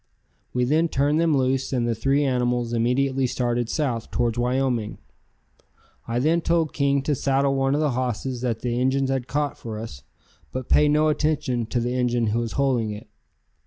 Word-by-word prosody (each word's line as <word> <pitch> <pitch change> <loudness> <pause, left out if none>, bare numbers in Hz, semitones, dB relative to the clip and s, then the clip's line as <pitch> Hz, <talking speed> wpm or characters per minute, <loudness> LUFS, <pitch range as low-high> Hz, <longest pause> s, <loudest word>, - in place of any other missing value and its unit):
We 125 - 0
then 155 +6 +2
turned 145 +1 +1
them 160 -4 +3
loose 130 0 0
and 120 -3 0
the 115 - +1
three 135 +6 +1
animals 125 -3 0
immediately 130 +3 +1
started 120 -1 -1
south 125 -7 -2
towards 115 -2 0
Wyoming. 125 -2 -1 1.1
I 115 +1 -2
then 160 +7 +2
told 165 -2 +1
King 140 -1 +1
to 150 - 0
saddle 135 +1 +1
one 135 0 +1
of 150 - 0
the 150 -2 +1
hosses 125 0 -2
that 120 -3 -2
the 120 -1 -1
Injuns 135 +1 +1
had 130 -2 -2
caught 145 0 -2
for 110 -2 -6
us, 105 - -8 0.5
but 130 -1 -5
pay 150 - +5
no 150 +1 +3
attention 135 -6 0
to 120 - -1
the 120 +1 -1
Injun 120 -2 +1
who 115 - +1
was 115 -1 -3
holding 130 -5 +1
it. 105 +2 -8
130 Hz, 185 wpm, -24 LUFS, 120-140 Hz, 1.1 s, pay